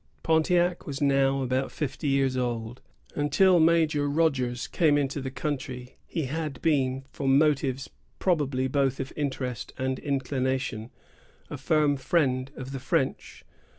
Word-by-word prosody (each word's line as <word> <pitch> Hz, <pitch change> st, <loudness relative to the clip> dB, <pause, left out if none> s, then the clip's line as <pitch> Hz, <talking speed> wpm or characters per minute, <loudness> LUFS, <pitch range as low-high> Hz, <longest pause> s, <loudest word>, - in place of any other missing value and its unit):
Pontiac 175 Hz, +2 st, +2 dB
was 140 Hz, -1 st, -4 dB
now 135 Hz, -1 st, +2 dB
about 130 Hz, +1 st, -1 dB
fifty 145 Hz, 0 st, -4 dB
years 135 Hz, -1 st, +2 dB
old. 120 Hz, -1 st, -3 dB, 0.3 s
Until 175 Hz, +5 st, +4 dB
Major 160 Hz, -3 st, +3 dB
Rogers 135 Hz, -6 st, 0 dB
came 155 Hz, -4 st, +2 dB
into 140 Hz, 0 st, -1 dB
the 130 Hz, -, -4 dB
country, 130 Hz, -3 st, -5 dB
he 165 Hz, -, -2 dB
had 145 Hz, -1 st, -4 dB
been, 135 Hz, -4 st, +1 dB
from 135 Hz, -1 st, +2 dB
motives 140 Hz, -3 st, +1 dB, 0.3 s
probably 140 Hz, -7 st, +1 dB
both 135 Hz, -1 st, 0 dB
of 135 Hz, 0 st, -5 dB
interest 130 Hz, -4 st, -3 dB
and 130 Hz, -1 st, -2 dB
inclination, 130 Hz, -4 st, -2 dB, 0.6 s
a -, -, -4 dB
firm 150 Hz, -2 st, +2 dB
friend 130 Hz, -3 st, +1 dB
of 130 Hz, 0 st, -7 dB
the 135 Hz, -, -4 dB
French. 130 Hz, +1 st, -2 dB
135 Hz, 135 wpm, -27 LUFS, 130-150 Hz, 0.6 s, Until